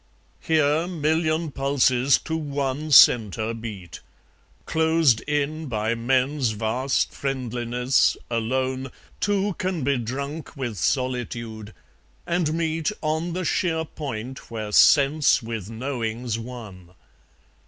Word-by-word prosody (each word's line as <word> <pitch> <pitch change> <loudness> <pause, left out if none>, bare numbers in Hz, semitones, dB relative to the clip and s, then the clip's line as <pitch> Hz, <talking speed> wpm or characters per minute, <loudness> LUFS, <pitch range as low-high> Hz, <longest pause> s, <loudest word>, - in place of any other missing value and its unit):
Here, 155 +1 +2
million 160 -1 0
pulses 135 -1 +3
to 160 - -2
one 145 -1 -3
centre 115 -5 +5
beat: 105 -7 -8 0.7
Closed 160 -7 +3
in 150 +1 -1
by 110 -1 -1
men's 130 +1 +1
vast 115 +5 0
friendliness, 125 -1 0
alone, 130 +3 -1 0.3
Two 205 -1 0
can 185 -5 -2
be 140 -1 +1
drunk 140 +7 -5
with 120 -6 -4
solitude, 115 - -2 0.5
and 170 -3 0
meet 160 +1 -1
On 160 +2 -1
the 185 0 -3
sheer 160 -2 0
point 130 -5 -7
where 110 -2 -5
sense 140 +4 +5
with 110 -3 -5
knowing's 115 -1 -3
one. 105 -7 -10
130 Hz, 105 wpm, -24 LUFS, 115-155 Hz, 0.7 s, centre